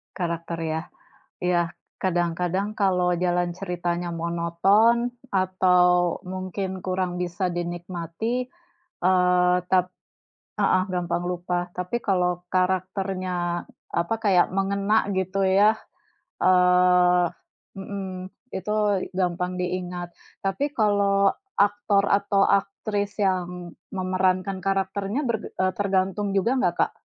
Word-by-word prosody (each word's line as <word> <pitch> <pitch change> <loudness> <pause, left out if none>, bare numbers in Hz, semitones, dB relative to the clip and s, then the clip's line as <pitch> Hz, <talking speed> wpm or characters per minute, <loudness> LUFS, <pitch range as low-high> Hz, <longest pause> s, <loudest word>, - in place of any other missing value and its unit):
Karakter 170 -1 -3
ya, 160 0 -1 0.6
ya 180 -1 +2 0.4
kadang-kadang 180 +3 -1
kalau 180 -3 +2
jalan 175 0 +1
ceritanya 175 -1 -3
monoton, 170 +8 +2 0.2
atau 180 -2 +3
mungkin 185 +1 -4
kurang 185 -1 -1
bisa 180 +1 -2
dinikmati, 175 +7 -3 0.6
eee, 180 -1 +4
tap 185 -1 +3 0.7
heeh, 185 - +3
gampang 175 -1 -1
lupa, 175 0 -3
tapi, 180 +6 -3
kalau 180 -3 +1
karakternya 185 -1 -1 0.4
apa 170 +7 -1
kayak 185 -4 +4
mengena 200 +2 +1
gitu 190 +1 0
ya, 205 +3 +4 0.6
eee 180 -1 +5 0.5
mhm, 190 -1 -6 0.2
itu 190 +3 -3 0.4
gampang 180 0 -1
diingat. 180 -1 -4 0.3
Tapi, 195 +9 0
kalau 200 -4 +3 0.2
aktor 205 0 +3
atau 200 0 +3
aktris 200 0 -1
yang 180 -2 -2 0.2
memerankan 185 0 0
karakternya 195 +5 -1
ber 235 -2 +1
eee, 185 0 -1
tergantung 195 0 0
juga 230 +6 +2
enggak 255 - +1
Kak? - - +2
185 Hz, 100 wpm, -25 LUFS, 180-195 Hz, 0.7 s, eee